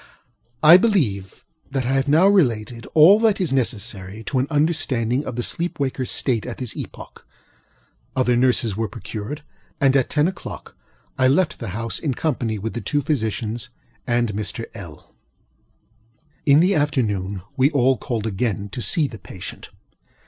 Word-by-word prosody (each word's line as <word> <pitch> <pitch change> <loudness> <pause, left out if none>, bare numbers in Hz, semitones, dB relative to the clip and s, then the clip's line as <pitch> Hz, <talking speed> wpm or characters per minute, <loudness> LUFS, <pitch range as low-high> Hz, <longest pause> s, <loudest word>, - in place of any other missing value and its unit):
I 160 +3 +10
believe 130 - 0 0.2
that 135 -3 -2
I 125 - 0
have 135 +1 +1
now 155 +6 +5
related 120 - +1
all 170 +7 +8
that 220 -3 +2
is 170 -8 0
necessary 105 -4 -3
to 130 +4 -1
an 130 - 0
understanding 145 -5 0
of 125 - -4
the 120 - -1
sleep 170 +7 -2
wakerŌĆÖs 130 -2 -2
state 120 -5 0
at 120 - -6
this 125 -4 -4
epoch. - - -9 0.9
Other 125 -2 +2
nurses 120 -4 +2
were 110 +1 -1
procured; 110 +9 -7 0.4
and 135 -1 +3
at 135 -3 +2
ten 150 0 +2
oŌĆÖclock 190 - -7 0.5
I 130 - +5
left 155 +6 +2
the 115 - -5
house 115 0 -2
in 145 -6 -2
company 120 -8 -1
with 110 +3 -4
the 120 - -4
two 145 +8 -1
physicians 115 -3 -2 0.4
and 120 -3 +1
Mr. 105 +3 -3
LŌĆöl. 85 -9 -10 1.4
In 140 +2 +6
the 185 +3 +3
afternoon 105 - -1
we 135 0 +4
all 135 -3 +3
called 115 -4 -4
again 105 -1 -2
to 125 - -6
see 155 +5 +2
the 115 -5 -10
patient. 95 0 -9
125 Hz, 160 wpm, -22 LUFS, 110-145 Hz, 1.4 s, I